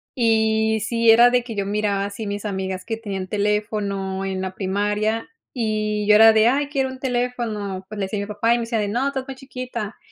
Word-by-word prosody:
Y 220 Hz, -2 st, +2 dB
sí, 230 Hz, -1 st, +4 dB
era 240 Hz, +2 st, +7 dB
de 250 Hz, -1 st, +2 dB
que 235 Hz, -2 st, -7 dB
yo 200 Hz, -1 st, -1 dB
miraba 200 Hz, -1 st, 0 dB
así 205 Hz, +1 st, -6 dB
mis 205 Hz, +1 st, -4 dB
amigas 190 Hz, -2 st, -3 dB
que 225 Hz, -, -2 dB
tenían 195 Hz, -4 st, -5 dB
teléfono 200 Hz, -2 st, -1 dB
en 190 Hz, -1 st, -3 dB
la 190 Hz, 0 st, -4 dB
primaria 205 Hz, +3 st, -1 dB, 0.3 s
y 215 Hz, -3 st, -1 dB
yo 210 Hz, -, +7 dB
era 225 Hz, +1 st, +9 dB
de, 220 Hz, +1 st, +4 dB
¡ay, 280 Hz, +3 st, +1 dB
quiero 270 Hz, -3 st, 0 dB
un 260 Hz, 0 st, -9 dB
teléfono!. 240 Hz, -7 st, -2 dB
Pues 215 Hz, -1 st, -7 dB
le 195 Hz, -, 0 dB
decía 200 Hz, +2 st, -3 dB
a -, -, -2 dB
mi -, -, -3 dB
papá 220 Hz, +3 st, +1 dB
y -, -, +2 dB
me -, -, -2 dB
decía 230 Hz, -1 st, -1 dB
de 205 Hz, -, 0 dB
no, 245 Hz, +7 st, 0 dB
estás 265 Hz, -2 st, -4 dB
muy 270 Hz, -, -6 dB
chiquita, 250 Hz, -5 st, -6 dB
215 Hz, 225 wpm, -22 LUFS, 200-235 Hz, 0.3 s, era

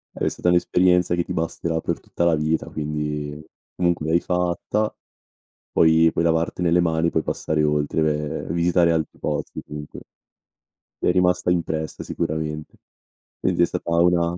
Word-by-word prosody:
È -, -, -1 dB
stata 90 Hz, -, -1 dB
un'esperienza 90 Hz, 0 st, +3 dB
che 85 Hz, -, 0 dB
ti -, -, -8 dB
basterà 80 Hz, 0 st, -2 dB
per -, -, -2 dB
tutta 85 Hz, -, -4 dB
la 85 Hz, -2 st, +4 dB
vita, 75 Hz, +1 st, -1 dB
quindi 75 Hz, -1 st, -4 dB, 0.4 s
comunque 85 Hz, -3 st, 0 dB
l'hai 85 Hz, +2 st, +3 dB
fatta, 90 Hz, +5 st, -1 dB, 0.8 s
puoi 80 Hz, 0 st, +5 dB
puoi 85 Hz, -, 0 dB
lavartene 85 Hz, +1 st, +1 dB
mani, 80 Hz, -1 st, +2 dB
puoi 80 Hz, -, 0 dB
passare 80 Hz, -1 st, -1 dB
oltre, 75 Hz, +1 st, +1 dB
beh, 75 Hz, 0 st, -1 dB
e 80 Hz, -, -2 dB
visitare 85 Hz, 0 st, +3 dB
altri 80 Hz, -2 st, -2 dB
posti -, -, -3 dB
comunque. 75 Hz, 0 st, -8 dB, 1.0 s
Ti -, -, -1 dB
è -, -, +5 dB
rimasta 90 Hz, 0 st, +2 dB
impressa 80 Hz, -3 st, -2 dB
sicuramente. 75 Hz, 0 st, -4 dB, 0.6 s
Quindi -, -, +1 dB
è 85 Hz, -, +7 dB
stata 90 Hz, -1 st, -4 dB
una 85 Hz, 0 st, +3 dB
80 Hz, 150 wpm, -23 LUFS, 80-85 Hz, 1.0 s, è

